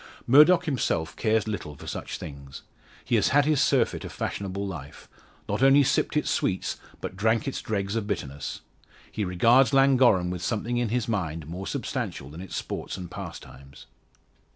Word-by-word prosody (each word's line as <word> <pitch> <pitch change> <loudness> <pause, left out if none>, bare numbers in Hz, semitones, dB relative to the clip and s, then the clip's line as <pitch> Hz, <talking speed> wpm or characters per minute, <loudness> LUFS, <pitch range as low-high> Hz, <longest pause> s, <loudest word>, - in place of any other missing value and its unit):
Murdock 155 +8 +6
himself 115 - -1
cares 110 -1 +1
little 90 -8 -4
for - - -12
such - - -5
things. 70 -2 -9 0.4
He - - -3
has - - +3
had 145 +1 +4
his 150 -2 +2
surfeit - - +2
of - - -7
fashionable 100 0 -4
life; 75 -6 -8 0.4
not - - -2
only 135 +1 +6
sipped 140 - +1
its 150 - 0
sweets, 95 -1 -1 0.2
but - - -5
drank 110 +5 +1
its 135 - -3
dregs 100 -1 -2
of 110 -3 -2
bitterness. 70 -9 -4 0.5
He 105 - -2
regards 115 +9 +4
Llangorren 130 -10 +4
with 90 -1 -5
something 115 +4 -1
in 120 -2 0
his 120 0 -1
mind 85 -8 -2
more 90 +5 -6
substantial 70 +1 -4
than 80 +4 -9
its 95 - -7
sports - - -4
and 90 -2 -8
pastimes. 70 0 -10
100 Hz, 170 wpm, -26 LUFS, 85-125 Hz, 0.5 s, Murdock